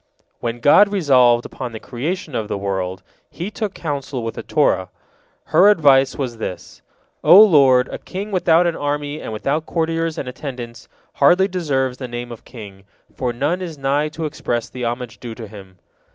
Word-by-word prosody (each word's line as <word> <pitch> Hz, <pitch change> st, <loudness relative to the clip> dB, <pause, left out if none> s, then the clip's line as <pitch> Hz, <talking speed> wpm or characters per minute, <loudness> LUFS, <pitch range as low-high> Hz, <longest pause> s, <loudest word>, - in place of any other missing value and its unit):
" -, -, -49 dB
When 120 Hz, 0 st, -4 dB
God 200 Hz, -, +6 dB
resolved 130 Hz, -10 st, +4 dB
upon 125 Hz, -2 st, -7 dB
the 110 Hz, -, -6 dB
creation 150 Hz, -, -5 dB
of 110 Hz, -3 st, -2 dB
the -, -, -3 dB
world, 95 Hz, -2 st, -3 dB, 0.3 s
He 180 Hz, +5 st, -6 dB
took 215 Hz, -3 st, -4 dB
counsel 140 Hz, -5 st, -4 dB
with 115 Hz, -, -4 dB
the -, -, -6 dB
Torah. -, -, +1 dB, 0.6 s
Her 195 Hz, +3 st, +7 dB
advice 140 Hz, -9 st, +4 dB
was 125 Hz, -4 st, -4 dB
this: 90 Hz, -, -7 dB, 0.4 s
"O 185 Hz, -, +8 dB
Lord, 135 Hz, -11 st, +6 dB
a -, -, -6 dB
king 200 Hz, +3 st, -6 dB
without 175 Hz, -2 st, +3 dB
an 170 Hz, -2 st, 0 dB
army 145 Hz, +1 st, -3 dB
and -, -, -6 dB
without 140 Hz, +9 st, -2 dB
courtiers 165 Hz, -1 st, -1 dB
and 135 Hz, -, -4 dB
attendants 125 Hz, -3 st, -8 dB, 0.3 s
hardly 180 Hz, +7 st, +4 dB
deserves 135 Hz, -9 st, -1 dB
the 130 Hz, -, -5 dB
name 120 Hz, 0 st, -6 dB
of 115 Hz, -1 st, -10 dB
king, 100 Hz, -5 st, -12 dB, 0.3 s
for 125 Hz, -2 st, -2 dB
none 145 Hz, +10 st, -1 dB
is 165 Hz, -4 st, -6 dB
nigh 140 Hz, +2 st, 0 dB
to 155 Hz, +1 st, -5 dB
express 120 Hz, -6 st, -3 dB
the 125 Hz, -1 st, -5 dB
homage 120 Hz, 0 st, -4 dB
due 120 Hz, -3 st, -7 dB
to 115 Hz, -, -8 dB
him." 95 Hz, -3 st, -13 dB
135 Hz, 180 wpm, -20 LUFS, 120-160 Hz, 0.6 s, O